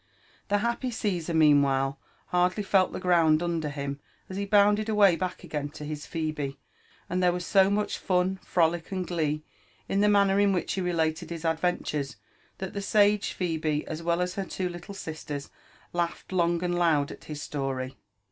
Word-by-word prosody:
" -, -, -32 dB
The 205 Hz, -, +3 dB
happy 235 Hz, +4 st, -1 dB
Gssar, 180 Hz, -8 st, -2 dB
meanwhile, 140 Hz, -3 st, +4 dB, 0.3 s
hardly 180 Hz, +3 st, +2 dB
felt 190 Hz, -1 st, +3 dB
the -, -, -5 dB
ground 165 Hz, -3 st, +4 dB
under 165 Hz, -3 st, -1 dB
hink 140 Hz, -1 st, -4 dB, 0.3 s
as 190 Hz, -, -5 dB
he 200 Hz, 0 st, -2 dB
bounded 210 Hz, +1 st, +4 dB
away 205 Hz, -4 st, +5 dB
back 180 Hz, +2 st, -4 dB
again 145 Hz, -1 st, -3 dB
to 150 Hz, -, -6 dB
his 150 Hz, 0 st, -6 dB
Phebe; 155 Hz, -4 st, -3 dB, 0.5 s
and 180 Hz, 0 st, -1 dB
there 180 Hz, -1 st, +4 dB
was 180 Hz, 0 st, -3 dB
so 195 Hz, -1 st, +5 dB
much 210 Hz, +1 st, -1 dB
fun, 185 Hz, +1 st, +1 dB
frolic, 170 Hz, 0 st, +1 dB
and 185 Hz, -1 st, -2 dB
glee 155 Hz, -3 st, -1 dB, 0.4 s
in 195 Hz, -, 0 dB
the 210 Hz, -, +4 dB
manner 200 Hz, -1 st, +4 dB
in 200 Hz, -1 st, +4 dB
which 180 Hz, -3 st, -1 dB
he 190 Hz, -, -1 dB
related 165 Hz, -3 st, 0 dB
his 170 Hz, -1 st, -6 dB
adventures, 160 Hz, -5 st, -1 dB, 0.4 s
tliat 190 Hz, -1 st, -5 dB
the 200 Hz, -, -3 dB
sage 205 Hz, 0 st, +3 dB
Phebe, 160 Hz, -4 st, -1 dB
as 155 Hz, +1 st, -5 dB
well 170 Hz, +1 st, +1 dB
as 180 Hz, 0 st, -3 dB
her 195 Hz, 0 st, -3 dB
two 185 Hz, 0 st, -3 dB
little 175 Hz, +3 st, -8 dB
sisters, 150 Hz, -5 st, -6 dB, 0.4 s
laughed 175 Hz, +1 st, -2 dB
long 170 Hz, -1 st, +1 dB
and 175 Hz, 0 st, 0 dB
loud 155 Hz, -5 st, +2 dB
at -, -, -11 dB
his 150 Hz, -1 st, -6 dB
story. 135 Hz, -2 st, -3 dB
175 Hz, 185 wpm, -27 LUFS, 155-195 Hz, 0.5 s, away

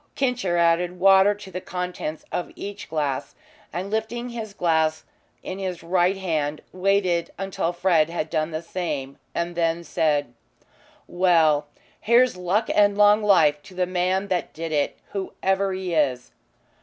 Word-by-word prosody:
"Kincher" 250 Hz, -10 st, 0 dB
added 170 Hz, +1 st, +2 dB
water 195 Hz, +2 st, +6 dB
to 205 Hz, -2 st, -12 dB
the 185 Hz, -, -5 dB
contents 180 Hz, -4 st, -5 dB
of 175 Hz, -, -3 dB
each 205 Hz, 0 st, -7 dB
glass, 145 Hz, -2 st, -2 dB, 0.4 s
and, 190 Hz, +3 st, -4 dB
lifting 230 Hz, +3 st, -2 dB
his 225 Hz, -3 st, -6 dB
glass 160 Hz, -4 st, +1 dB, 0.4 s
in 185 Hz, -, -5 dB
his 185 Hz, -3 st, -4 dB
right 180 Hz, +2 st, +2 dB
hand, 155 Hz, -5 st, -2 dB
waited 185 Hz, -2 st, +1 dB
until 195 Hz, -2 st, -2 dB
Fred 175 Hz, -3 st, +2 dB
had 170 Hz, -2 st, -3 dB
done 155 Hz, 0 st, -1 dB
the 160 Hz, 0 st, -5 dB
same 150 Hz, -6 st, -4 dB, 0.2 s
and 170 Hz, +1 st, -2 dB
then 170 Hz, 0 st, 0 dB
said: 145 Hz, -6 st, 0 dB, 0.7 s
"Well, 165 Hz, -5 st, +3 dB, 0.3 s
here's 240 Hz, +1 st, +4 dB
luck 185 Hz, +5 st, 0 dB
and 205 Hz, -1 st, +4 dB
long 210 Hz, +1 st, +6 dB
life 160 Hz, -8 st, +4 dB
to 185 Hz, -, -15 dB
the 180 Hz, 0 st, +1 dB
man 185 Hz, +2 st, 0 dB
that 180 Hz, -2 st, -1 dB
did 165 Hz, 0 st, -5 dB
it 145 Hz, -2 st, 0 dB
whoever 195 Hz, 0 st, -1 dB
he 185 Hz, -2 st, -3 dB
is." 130 Hz, -6 st, 0 dB
180 Hz, 150 wpm, -24 LUFS, 160-195 Hz, 0.7 s, water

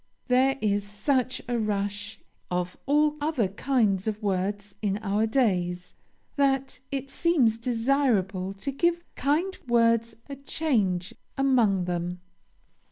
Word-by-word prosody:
There 260 Hz, +2 st, +4 dB
is 205 Hz, -1 st, +1 dB
such 255 Hz, +5 st, -1 dB
a 240 Hz, -1 st, 0 dB
rush 205 Hz, 0 st, -2 dB, 0.3 s
of 180 Hz, 0 st, -2 dB
all 300 Hz, +1 st, +3 dB
other 295 Hz, -9 st, +1 dB
kinds 210 Hz, -3 st, +1 dB
of 215 Hz, -1 st, -1 dB
words 200 Hz, +1 st, -2 dB
in 200 Hz, -2 st, 0 dB
our 210 Hz, +2 st, +1 dB
days, 180 Hz, -7 st, 0 dB, 0.4 s
that 270 Hz, -1 st, +1 dB
it 275 Hz, 0 st, -4 dB
seems 260 Hz, -10 st, +2 dB
desirable 230 Hz, -6 st, +1 dB
to 275 Hz, +8 st, -4 dB
give 345 Hz, +5 st, +1 dB
kind 320 Hz, +8 st, 0 dB
words 230 Hz, -1 st, +3 dB
a 280 Hz, -1 st, -7 dB
change 215 Hz, -, 0 dB, 0.2 s
among 235 Hz, -9 st, +3 dB
them. 175 Hz, 0 st, -3 dB
225 Hz, 120 wpm, -27 LUFS, 200-270 Hz, 0.4 s, There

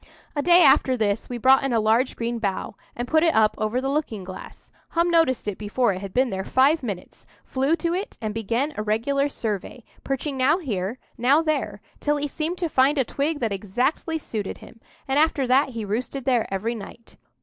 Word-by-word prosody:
A 290 Hz, -, +1 dB
day 350 Hz, +2 st, +6 dB
after 260 Hz, -1 st, +5 dB
this 210 Hz, -1 st, -1 dB
we 245 Hz, -, -4 dB
brought 260 Hz, +3 st, +5 dB
in 270 Hz, -2 st, 0 dB
a 230 Hz, -, +3 dB
large 225 Hz, +4 st, +2 dB
green 235 Hz, 0 st, -3 dB
bough, 200 Hz, -3 st, -2 dB, 0.2 s
and 240 Hz, +1 st, -4 dB
put 315 Hz, +3 st, +3 dB
it 330 Hz, -1 st, +3 dB
up 215 Hz, -1 st, +4 dB
over 215 Hz, +3 st, 0 dB
the 265 Hz, -, -2 dB
looking 275 Hz, -8 st, -2 dB
glass. 185 Hz, 0 st, -11 dB, 0.2 s
Hum 340 Hz, +1 st, +1 dB
noticed 325 Hz, -10 st, +2 dB
it 205 Hz, -, -3 dB
before 215 Hz, +1 st, +1 dB
it 185 Hz, -, -6 dB
had 200 Hz, -1 st, -6 dB
been 255 Hz, +4 st, +1 dB
there 190 Hz, 0 st, -3 dB
five 280 Hz, +8 st, +3 dB
minutes, 200 Hz, -8 st, -7 dB, 0.2 s
flew 275 Hz, +5 st, +1 dB
to 335 Hz, +1 st, -2 dB
it, 390 Hz, +6 st, -4 dB
and 215 Hz, -2 st, -3 dB
began 230 Hz, +7 st, -1 dB
a -, -, -1 dB
regular 255 Hz, +7 st, 0 dB
survey, 220 Hz, -1 st, -4 dB, 0.2 s
perching 275 Hz, +1 st, -3 dB
now 270 Hz, +6 st, +3 dB
here, 220 Hz, -, -3 dB, 0.2 s
now 275 Hz, +7 st, +4 dB
there, 310 Hz, -1 st, -2 dB, 0.2 s
till 295 Hz, 0 st, +1 dB
he 290 Hz, 0 st, -2 dB
seemed 320 Hz, +5 st, -3 dB
to 350 Hz, -, -1 dB
find 275 Hz, 0 st, +3 dB
a 265 Hz, -, +2 dB
twig 290 Hz, +5 st, -2 dB
that 225 Hz, -4 st, 0 dB
exactly 245 Hz, +11 st, -1 dB
suited 215 Hz, -9 st, -5 dB
him; 230 Hz, -, -15 dB, 0.3 s
and 270 Hz, +2 st, +2 dB
after 300 Hz, -3 st, +2 dB
that 260 Hz, +3 st, +3 dB
he 230 Hz, -4 st, -5 dB
roosted 250 Hz, +5 st, -3 dB
there 245 Hz, -6 st, +1 dB
every 205 Hz, +5 st, -1 dB
night. 230 Hz, +1 st, -11 dB
255 Hz, 210 wpm, -24 LUFS, 220-290 Hz, 0.3 s, day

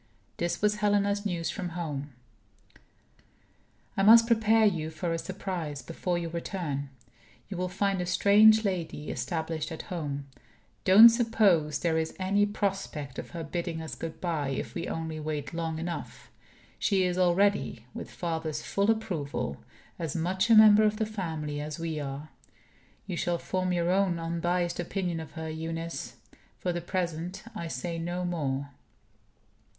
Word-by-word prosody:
This 175 Hz, +4 st, -2 dB
was 210 Hz, 0 st, +3 dB
Helena's 205 Hz, 0 st, +1 dB
news 170 Hz, -3 st, -2 dB
from 180 Hz, -3 st, -4 dB
home: 145 Hz, -4 st, -4 dB, 1.8 s
"I -, -, +1 dB
must 230 Hz, +3 st, +8 dB
prepare 225 Hz, -1 st, +4 dB
you 165 Hz, -6 st, +1 dB
for 165 Hz, +2 st, -3 dB
a 165 Hz, -, -1 dB
surprise, 180 Hz, -6 st, -4 dB
before 175 Hz, +1 st, -2 dB
your 170 Hz, -1 st, -4 dB
return. 165 Hz, -5 st, -3 dB, 0.6 s
You 195 Hz, -, -5 dB
will 180 Hz, 0 st, -1 dB
find 195 Hz, 0 st, 0 dB
a 180 Hz, -, -3 dB
strange 215 Hz, +4 st, +6 dB
lady 170 Hz, -6 st, -2 dB
established 160 Hz, +4 st, -3 dB
at 160 Hz, -, -6 dB
home. 145 Hz, -4 st, -3 dB, 0.6 s
Don't 210 Hz, +5 st, +10 dB
suppose 215 Hz, -10 st, +3 dB
there 160 Hz, -2 st, +1 dB
is 160 Hz, 0 st, -3 dB
any 200 Hz, +2 st, +2 dB
prospect 195 Hz, -9 st, -3 dB
of -, -, -7 dB
her 170 Hz, -2 st, -6 dB
bidding 170 Hz, +1 st, -3 dB
us 160 Hz, -1 st, -6 dB
good 165 Hz, -1 st, -6 dB
by, 160 Hz, -6 st, -1 dB
if 135 Hz, -, -3 dB
we 170 Hz, -, -4 dB
only 160 Hz, -1 st, -4 dB
wait 150 Hz, -1 st, -4 dB
long 165 Hz, -1 st, -2 dB
enough. 170 Hz, +1 st, -6 dB, 0.5 s
She 195 Hz, -3 st, +2 dB
is 180 Hz, 0 st, 0 dB
already 180 Hz, -, +2 dB
(with -, -, -7 dB
father's 160 Hz, -3 st, -3 dB
full 200 Hz, +2 st, 0 dB
approval) 175 Hz, -, -1 dB, 0.4 s
as 160 Hz, -4 st, -3 dB
much 185 Hz, +6 st, 0 dB
a 230 Hz, -, +8 dB
member 215 Hz, -1 st, +9 dB
of 215 Hz, 0 st, +2 dB
the 220 Hz, -, 0 dB
family 160 Hz, -8 st, -4 dB
as 150 Hz, 0 st, -5 dB
we 165 Hz, -2 st, -3 dB
are. 140 Hz, +1 st, -5 dB, 0.8 s
You 190 Hz, -4 st, -4 dB
shall 175 Hz, 0 st, 0 dB
form 185 Hz, +1 st, -2 dB
your 175 Hz, 0 st, +1 dB
own 190 Hz, -2 st, +2 dB
unbiased 170 Hz, +1 st, -1 dB
opinion 175 Hz, -1 st, -2 dB
of 160 Hz, -, -8 dB
her, 160 Hz, -1 st, -5 dB
Eunice. 165 Hz, +1 st, -5 dB, 0.4 s
For 180 Hz, -, -2 dB
the 175 Hz, -, -3 dB
present, 175 Hz, 0 st, -3 dB
I 170 Hz, -, -5 dB
say 165 Hz, +4 st, -4 dB
no 175 Hz, +2 st, -3 dB
more." 140 Hz, -5 st, -2 dB
175 Hz, 155 wpm, -29 LUFS, 160-195 Hz, 1.8 s, Don't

